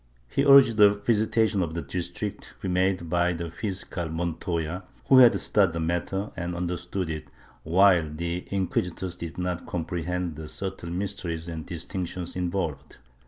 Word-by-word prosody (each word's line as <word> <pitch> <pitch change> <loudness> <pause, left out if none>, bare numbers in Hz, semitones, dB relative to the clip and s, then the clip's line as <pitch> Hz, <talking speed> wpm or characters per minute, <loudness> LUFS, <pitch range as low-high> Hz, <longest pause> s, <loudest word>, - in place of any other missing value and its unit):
He - - 0
urged 135 -5 +7
a 105 -1 +7
visitation 110 0 +2
of 80 -2 -2
the 85 - -3
district, 90 -2 -4
to - - -12
be - - -1
made 90 -1 +1
by 85 +1 +2
the 85 -1 -5
fiscal 90 -3 -4
Montoya, 85 +1 -2 0.3
who 130 - +8
had 120 -2 +7
studied 100 -5 +2
the 85 - -2
matter 85 +5 -2
and 85 0 -3
understood 90 +1 -3
it, 75 -1 -5 0.3
while 90 -1 +4
the 85 +3 -4
inquisitors 90 -2 -2
did 85 -1 -7
not 90 -1 -3
comprehend 85 0 -3
the 80 -1 -7
subtile 95 -1 -5
mysteries 90 -3 -3
and 80 -2 -6
distinctions 90 +1 -5
involved. 85 -6 -3
90 Hz, 155 wpm, -26 LUFS, 85-95 Hz, 0.3 s, who